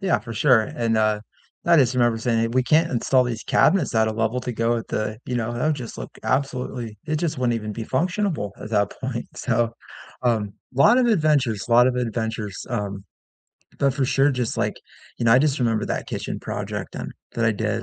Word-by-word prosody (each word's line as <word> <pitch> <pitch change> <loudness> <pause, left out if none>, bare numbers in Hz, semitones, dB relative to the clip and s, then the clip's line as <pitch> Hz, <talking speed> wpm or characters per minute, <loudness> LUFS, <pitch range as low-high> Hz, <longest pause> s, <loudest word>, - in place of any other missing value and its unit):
yeah, 190 -3 +2
for 115 - -8
sure 120 -1 +4
and, 115 +1 -1
uh, 110 -1 +2 0.5
I 170 -1 +6
just 130 -2 +3
remember 120 -2 +2
saying, 115 0 +1
"We 130 +2 +2
can't 155 +7 +3
install 130 +1 +2
these 120 -2 -3
cabinets 165 -7 +2
at 110 0 +4
a 110 - 0
level 110 +2 0
to 125 0 -4
go 115 +1 +1
with 115 -1 -3
the 110 0 -2
you 125 - -4
know, 120 -1 -1
that 120 +5 -2
would 155 - +2
just 125 -5 -7
look - - -6
absolutely 125 -5 -2
it 155 0 0
just 160 -2 -2
wouldn't 125 -2 +1
even 110 -2 -4
be 115 +2 -5
functionable 170 - -1
at - - -6
that 105 -2 +2
point." 125 -3 -3
So, 120 -2 0 0.5
um, 110 -5 +1 0.2
lot 140 - +6
of 255 - +3
adventures, 150 - +2
lot 120 +1 +6
of 130 -1 +1
adventures, 110 -4 -3
um, 100 -5 -3 0.8
but 140 -1 +3
for 140 -1 +1
sure, 135 +2 +3
just, 125 -4 -2
like - - -1 0.4
you - - -2
know, 115 - +5
I 125 - +7
just 145 -1 +1
remember 115 -3 +1
that - - -3
kitchen - - -4
project - - -5
and - - -5 0.2
that 115 - 0
I 110 - +4
did 110 +1 -2
120 Hz, 210 wpm, -23 LUFS, 110-135 Hz, 0.8 s, I